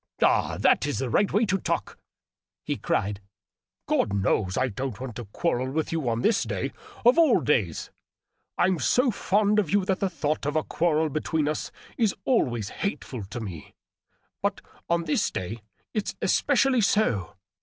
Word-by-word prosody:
" - - -29
Ah, - - +2
that - - +3
is 145 - -1
the 130 -3 -2
right 200 - +2
way 215 +3 +3
to 195 -1 0
talk - - -3 0.3
!" - - -67
he - - -1
cried. 100 0 -1 0.3
" - - -62
God 100 - +1
knows 95 -1 +1
I 130 - +2
don't 125 +1 -4
want 125 -4 -6
to 120 - -6
quarrel 130 - -1
with 155 +3 -2
you 160 -7 -1
on 115 0 -1
this 225 0 +3
day, - - -2 0.3
of 250 +7 +6
all 315 -8 +5
days! 100 - 0 0.7
I'm 185 -2 +2
so 250 - +3
fond 210 +1 +2
of 195 -7 0
you 200 +1 +2
that 190 0 0
the 195 - 0
thought 155 -4 -2
of 145 - -1
a 155 - +2
quarrel 160 -2 +1
between 155 +1 -1
us 150 - -2 0.3
is 220 -4 +2
always 120 - +1
hateful 130 - -3
to 110 +5 -6
me 90 -7 -8 0.3
— - - -45
but - - -1 0.3
on 170 0 +2
this 155 - +1
day 105 +5 -5 0.3
it's 215 - -2
especially 265 -3 +3
so. 160 - +1
155 Hz, 185 wpm, -26 LUFS, -, 0.7 s, of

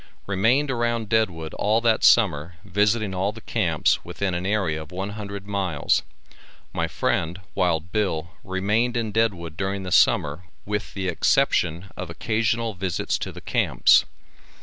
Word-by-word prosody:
Remained 115 +9 +2
around 120 -3 -1
Deadwood 90 -8 0
all 110 +2 +2
that 115 -2 +2
summer 85 -7 +4
visiting 105 +2 +1
all 95 +2 0
the 115 - -11
camps 90 -9 +1
within 95 +2 -3
an 90 +2 -2
area 95 -7 0
of 80 - -11
one 95 +3 -4
hundred 100 -2 -7
miles. 95 -7 0 0.7
My - - -1
friend, 85 +4 -1
Wild 85 -2 0
Bill, 85 -6 -1
remained 105 +6 0
in 115 -2 -1
Deadwood 95 -7 0
during 95 +1 -2
the 90 - -6
summer 75 +2 +3 0.2
with 105 0 -4
the 95 -1 -2
exception 90 - +1
of 90 - -6
occasional 115 +4 -1
visits 95 -2 -2
to - - -4
the - - -10
camps. - - +4
100 Hz, 150 wpm, -24 LUFS, 85-110 Hz, 0.7 s, summer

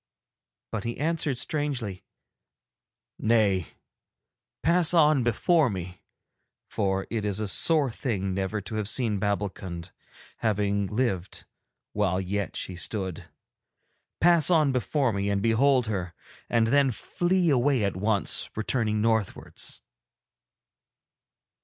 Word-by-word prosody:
But 110 -3 -3
he 115 0 -4
answered 155 -3 -1
strangely: 125 - -3 1.2
'Nay, 105 -6 +2 1.0
pass 170 +1 +4
on 155 -4 +4
before 130 +6 +2
me, 90 -2 -7 0.7
for 95 -1 -1
it 115 -2 -2
is 105 -1 -1
a 105 - -2
sore 140 - +4
thing 100 -7 -3
never 95 +2 -2
to 105 +3 -7
have 105 -1 -2
seen 110 -6 +1
Babbulkund, 95 -3 -4 0.5
having 100 -2 0
lived 100 -5 -2 0.5
while 95 -3 0
yet 100 +2 -3
she 95 - -3
stood. 95 0 -4 0.9
Pass 170 -2 +6
on 155 -5 +3
before 130 0 0
me 100 0 -1
and 100 -1 0
behold 125 +3 +3
her, 90 -6 -4 0.3
and 115 -1 +2
then 140 +3 +3
flee 175 - 0
away 130 -2 +2
at 100 -2 -1
once, 100 +1 +1
returning 110 -1 0
northwards.' 110 -3 -1
110 Hz, 115 wpm, -26 LUFS, 100-135 Hz, 1.2 s, Pass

